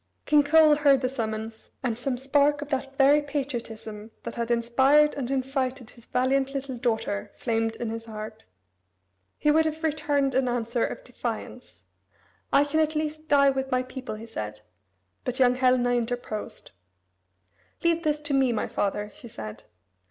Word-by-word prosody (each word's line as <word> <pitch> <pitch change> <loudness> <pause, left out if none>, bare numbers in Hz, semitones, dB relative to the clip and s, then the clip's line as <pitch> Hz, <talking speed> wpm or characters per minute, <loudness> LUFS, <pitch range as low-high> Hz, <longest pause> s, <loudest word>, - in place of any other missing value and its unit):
King 300 -1 +5
Coel 305 +1 +6
heard 280 -3 +4
the 255 - 0
summons, 220 -3 -5
and 240 -3 0
some 250 +2 -2
spark 285 +2 +2
of 295 - -12
that 270 -1 -3
very 285 +2 +6
patriotism 235 -7 -5
that 235 - -5
had 235 0 -3
inspired 265 +6 +4
and 255 -3 -4
incited 260 -2 -2
his 235 - -18
valiant 265 +2 +1
little 270 -1 -3
daughter 225 -4 -2
flamed 225 -1 -1
in 225 -1 -4
his 225 0 -6
heart. 215 0 -8 0.9
He 300 - +3
would 320 +1 +4
have 315 +1 -3
returned 290 -3 +1
an 260 0 +2
answer 235 -1 -1
of - - -3
defiance. - - -6 0.7
"I 280 - +6
can 290 +2 0
at 315 0 +1
least 310 0 -3
die 280 -2 +5
with 265 0 -3
my 255 0 +1
people," 255 -2 -7
he 220 +2 -9
said, 105 - -6 0.6
but 250 0 -3
young 250 -1 +5
Helena 250 -1 +3
interposed. 240 -3 -3 1.1
"Leave 335 0 +2
this 300 -2 0
to 295 -1 -2
me, 265 -2 +3
my 225 - -1
father," 205 +1 -2
she 235 - -12
said. 110 - -8
260 Hz, 165 wpm, -26 LUFS, 230-285 Hz, 1.1 s, Coel